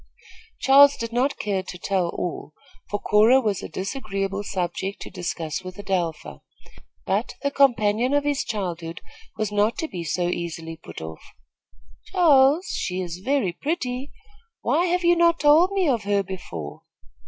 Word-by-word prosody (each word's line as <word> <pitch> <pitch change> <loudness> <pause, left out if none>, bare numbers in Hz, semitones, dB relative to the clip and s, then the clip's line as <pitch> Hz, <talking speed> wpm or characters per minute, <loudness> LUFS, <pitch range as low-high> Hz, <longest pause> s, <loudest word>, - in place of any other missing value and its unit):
Charles 280 +1 +6
did 230 0 -5
not 260 +4 +1
care 200 -2 -1
to 185 -1 -9
tell 185 -1 0
all, 170 -3 -5 0.4
for 205 - -2
Cora 220 +7 +5
was 210 -7 -1
a - - -7
disagreeable 195 +1 -3
subject 190 +1 -3
to - - -10
discuss 170 -3 -4
with 185 +1 -8
Adelpha; 185 -5 -3 0.6
but - - -1
the 280 - +1
companion 240 -3 +3
of 290 - +2
his 290 -1 0
childhood 170 -6 -4 0.4
was 215 -2 -2
not 210 +2 +1
to 320 - -2
be 175 - -6
so 175 +2 -1
easily 165 -2 -4
put 160 - -11
off. 80 0 -8 0.8
"Charles, 315 -2 +4
she 185 0 -2
is 175 -1 -5
very 265 -9 +1
pretty. 265 - -3 0.5
Why 345 - +2
have 360 +1 0
you 345 0 +5
not 340 0 +3
told 310 +6 +5
me 385 -3 +1
of 235 -7 0
her 200 -1 +1
before?" 85 - -7
205 Hz, 155 wpm, -24 LUFS, 180-275 Hz, 0.8 s, Charles